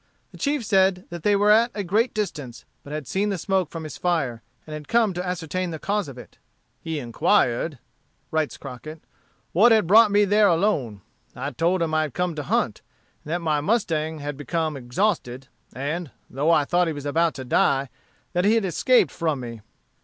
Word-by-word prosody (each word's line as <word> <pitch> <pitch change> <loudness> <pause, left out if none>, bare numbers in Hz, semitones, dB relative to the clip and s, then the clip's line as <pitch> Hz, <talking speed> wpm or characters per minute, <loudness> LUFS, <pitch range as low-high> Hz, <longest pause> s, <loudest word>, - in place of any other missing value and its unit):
The - - -13
chief 285 -4 0
said 190 -2 +2
that 170 -1 -6
they 205 +4 +3
were 205 +1 +4
at 230 +3 +5
a 205 - -2
great 215 +7 +1
distance, 150 - -5 0.2
but 145 - -11
had 150 -1 -4
seen 200 +7 -1
the 195 - -1
smoke 190 0 0
from 165 -1 -7
his 155 - -8
fire, 140 -10 -1 0.2
and 155 - -9
had 150 -1 -7
come 230 -4 +2
to 180 +1 -3
ascertain 180 0 -3
the 160 - -5
cause 200 +3 -1
of 135 -2 -10
it. 125 - -13 0.4
"He 160 -1 -4
inquired," 120 +2 +1 0.5
writes 155 -2 -1
Crockett, 155 +5 -9 0.5
"what 220 +8 +5
had 220 -4 +4
brought 215 +5 +7
me 205 0 +4
there 205 +1 +4
alone. 160 - +1 0.3
I 140 +3 -4
told 170 +6 +1
him 160 -1 -2
I 155 - +3
had 155 -3 -4
come 180 -1 0
to 150 - -4
hunt, 140 - -1 0.4
and - - -11
that 175 +1 -1
my 150 -2 +1
mustang 160 -5 0
had 145 -1 -5
become 155 +1 -2
exhausted, 130 - -2 0.2
and, 150 +5 -4 0.2
though 145 +5 0
I 155 -3 +4
thought 175 +3 +2
he 160 - -1
was 145 -1 -7
about 165 +3 +1
to 130 - -7
die, 135 +2 +2 0.4
that 180 0 +1
he 210 +3 +4
had 225 -3 +1
escaped 190 - +3
from 160 -5 -1
me. 115 -3 -7
165 Hz, 200 wpm, -24 LUFS, 145-195 Hz, 0.5 s, brought